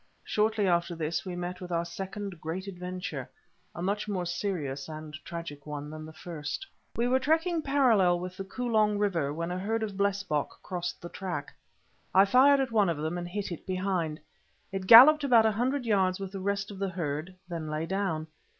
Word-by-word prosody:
Shortly 215 0 +1
after 170 -1 +1
this 165 +2 -2
we 180 - -4
met 175 +1 -5
with 180 -1 -7
our 170 0 0
second 190 +1 -6
great 170 +4 -4
adventure, 180 -1 -5 0.5
a 170 - -4
much 205 +3 -1
more 190 -4 -2
serious 165 -7 -3
and 155 -1 -8
tragic 165 -4 -7
one 150 0 -5
than 155 0 -8
the - - -9
first. 155 - -5 0.3
We 235 +1 +1
were 260 +1 +3
trekking 325 +4 +1
parallel 235 -12 +3
with 180 +1 -6
the 195 - -5
Kolong 215 0 +1
river 175 -9 0
when 170 +3 -3
a 180 - -2
herd 220 +4 -1
of 205 -3 -4
blesbock 195 -7 -1
crossed 180 0 -4
the 175 - -6
track. 185 0 -5 0.6
I 195 +1 +8
fired 270 +7 +6
at 265 -3 0
one 210 -4 +3
of 165 - -1
them 155 +3 -2
and 175 0 -4
hit 200 +1 -4
it 170 - -7
behind. 185 -4 -1 0.5
It 190 -1 -4
galloped 280 +8 +10
about 240 -5 +5
a 220 - +4
hundred 250 +5 0
yards 190 -4 +2
with 195 -1 -5
the 195 - -5
rest 200 +1 -1
of 195 - -9
the 195 -1 -1
herd, 170 0 -4
then 165 -3 -5
lay 155 +1 -2
down. 185 -4 -1
185 Hz, 195 wpm, -29 LUFS, 170-210 Hz, 0.6 s, galloped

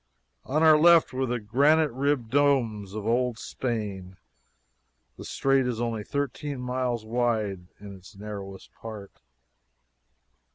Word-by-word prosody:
On 155 +4 0
our 155 -1 +7
left 170 -2 +5
were 130 0 -1
the 120 0 -2
granite 145 +8 +3
ribbed 130 -2 -1
domes 120 -8 +1
of 105 -1 -5
old 120 +1 0
Spain. 100 -7 -5 1.0
The - - -10
strait 135 -1 +1
is 120 -2 -3
only 115 -3 -2
thirteen 140 +1 -4
miles 125 -2 -2
wide 110 -6 -1
in 100 -1 -10
its 95 +3 -15
narrowest 100 -1 -8
part. 110 -3 -10
120 Hz, 125 wpm, -26 LUFS, 105-135 Hz, 1.0 s, our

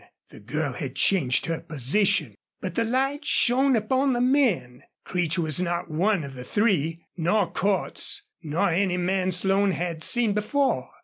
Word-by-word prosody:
The - - -13
girl 135 +6 -3
had 130 0 -6
changed 140 -11 +2
her 165 -1 -2
position. 155 - 0 0.3
But - - -5
the 230 - 0
light 270 +5 -1
shone 265 0 +3
upon 260 +5 +1
the 240 - -1
men. 245 - +1 0.2
Creech 175 -2 -1
was 160 0 +1
not 175 -2 -2
one 180 +2 +1
of 140 -1 -8
the 125 -1 -8
three, 165 - 0
nor 175 +2 +1
Cordts, 195 -1 -1 0.2
nor 160 +1 0
any 180 +1 +1
man 185 +1 0
Slone 195 +2 +2
had 170 -2 -4
seen 240 -4 +3
before. 210 - 0
185 Hz, 160 wpm, -25 LUFS, 160-220 Hz, 0.3 s, shone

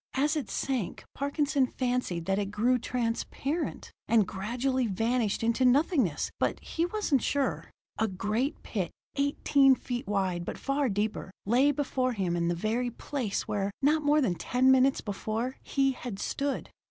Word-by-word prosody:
As 290 +3 +2
it 290 -8 -3
sank, 255 -9 -2
Parkinson 285 -1 +1
fancied 245 -11 -2
that 195 +2 +1
it 200 - -1
grew 235 +5 +2
transparent, 250 +6 -2 0.2
and 220 -4 +4
gradually 245 +6 -1
vanished 225 +2 0
into 230 +3 +2
nothingness 255 - +2
but - - 0
he 335 +1 -2
wasn't 355 - +1
sure. 280 +3 -1 0.3
A 220 - +3
great 215 +9 -2
pit, 190 -6 -2 0.3
eighteen 280 -1 +4
feet 245 -3 -5
wide, 190 -4 0
but - - -5
far 275 -1 0
deeper, 210 0 -2 0.2
lay 250 +7 +4
before 260 -3 0
him 185 -5 -1
in 170 -1 0
the 175 - +1
very 225 +7 0
place 240 -3 -3
where, 205 -2 -1
not 305 +3 +4
more 300 +1 +3
than 205 -10 +2
ten 255 +8 +2
minutes 265 +1 +4
before, 220 +5 -3
he 270 -1 +1
had 245 -5 -6
stood. 280 +7 -2
250 Hz, 155 wpm, -29 LUFS, 205-275 Hz, 0.3 s, and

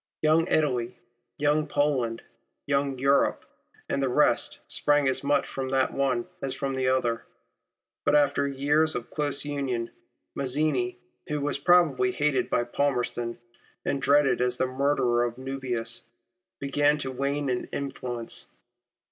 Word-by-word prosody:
Young 160 +2 +4
Italy, 125 -8 0 0.4
Young 150 +1 +2
Poland, 130 -6 0 0.4
Young 140 -1 0
Europe, 140 +2 +2 0.4
and 140 - -1
the 135 - +1
rest 125 - +2
sprang 145 -1 +2
as 130 - +2
much 140 0 +2
from 135 -1 -4
the 135 0 +3
one 130 -3 0 0.2
as 135 -1 -2
from 135 -1 -2
the 130 -1 0
other. 125 -3 +1 0.8
But - - +3
after 145 -1 +3
years 145 +3 +2
of 120 - -5
close 145 -1 -1
union, 135 -5 -2 0.4
Mazzini, 130 -3 0 0.3
who 150 0 -2
was 145 0 -1
probably 145 -7 +4
hated 145 0 0
by - - +2
Palmerston, 120 -2 -1 0.5
and 140 - -1
dreaded 140 -2 +3
as 125 0 +1
the - - +1
murderer 130 -2 +1
of 120 0 -3
Nubius, 125 -3 -4 0.6
began 145 +2 +2
to 135 -3 -4
wane 140 +2 -1
in 125 -1 -1
influence. 125 -4 -4
135 Hz, 140 wpm, -27 LUFS, 125-145 Hz, 0.8 s, Young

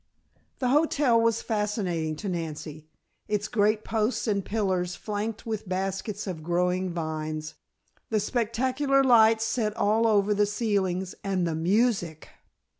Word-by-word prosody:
The 250 - 0
hotel 280 -4 +3
was 230 0 +1
fascinating 200 -8 -1
to 200 - -6
Nancy; 155 -3 -5 0.4
its 210 -1 -1
great 215 -1 +1
posts 220 +2 -1
and 200 -2 +1
pillars 185 -4 -1
flanked 210 +1 -4
with 215 -4 -4
baskets 195 +2 -3
of 180 -5 -5
growing 180 +2 0
vines, 155 -2 -4 0.6
the 220 - +1
spectacular 260 +5 +1
lights 225 -3 +5
set 220 -1 -1
all 225 +1 +3
over 210 -1 +3
the 205 0 +2
ceilings, 195 -4 -1
and 190 -3 0
the 165 - -1
music! 175 -1 0
205 Hz, 130 wpm, -27 LUFS, 180-225 Hz, 0.6 s, lights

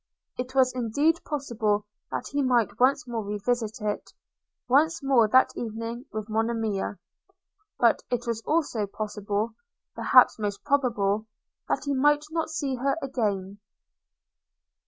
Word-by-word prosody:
It 255 +1 -5
was 255 -1 +4
indeed 285 +8 +1
possible 220 -8 -1 0.2
that - - -4
he 285 0 0
might 245 -4 +1
once 255 0 +3
more 230 -2 -3
revisit 215 +2 -2
it, 210 -1 -3 0.6
once 300 +4 +3
more 260 -5 +4
that 260 +4 +4
evening 230 +2 -5
with 215 -1 -4
Monimia; 220 -2 -1 0.8
but 235 -2 +3
it 245 -1 -1
was 230 -1 -2
also 295 -10 0
possible, 210 +1 -3 0.4
perhaps - - +5
most 205 -1 -3
probable, 225 -7 +1 0.4
that - - -1
he 285 - 0
might 295 +2 +3
not 325 -1 -1
see 290 -4 -2
her 275 +2 +1
again. 205 -8 -2
235 Hz, 130 wpm, -26 LUFS, 215-270 Hz, 0.8 s, perhaps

